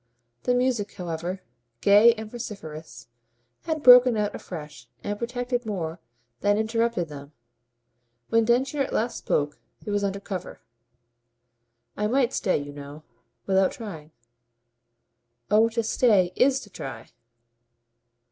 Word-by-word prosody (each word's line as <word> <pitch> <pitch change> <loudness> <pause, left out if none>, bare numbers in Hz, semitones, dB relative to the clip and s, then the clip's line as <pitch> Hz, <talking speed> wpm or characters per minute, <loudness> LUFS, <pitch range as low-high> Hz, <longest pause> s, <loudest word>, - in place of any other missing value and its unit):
The 250 - +2
music, 245 -5 0
however, 175 +1 -5 0.4
gay 210 +4 +6
and 220 -1 -7
vociferous, 160 - -8 0.6
had 315 -2 -2
broken 250 -2 +8
out 210 -1 -1
afresh 150 -4 -9 0.2
and 205 0 -3
protected 245 +1 -2
more 175 -7 -4 0.4
than 205 0 +2
interrupted 225 -4 0
them. 145 0 -10 1.0
When 230 0 +3
Densher 260 +5 +1
at 270 - -2
last 235 +2 -1
spoke 145 0 -1 0.3
it 210 - -3
was 205 0 0
under 200 0 -1
cover. 190 -2 -6 1.4
"I 210 - 0
might 250 +1 +1
stay, 190 - +1
you 145 0 -6
know, 145 +1 -10 0.4
without 190 -1 +2
trying." 165 -10 -8 1.4
"Oh 220 +2 +5
to 230 0 -1
stay 205 -6 +3
IS 270 0 +3
to 205 - -13
try." 120 -9 -8
205 Hz, 125 wpm, -25 LUFS, 170-235 Hz, 1.4 s, broken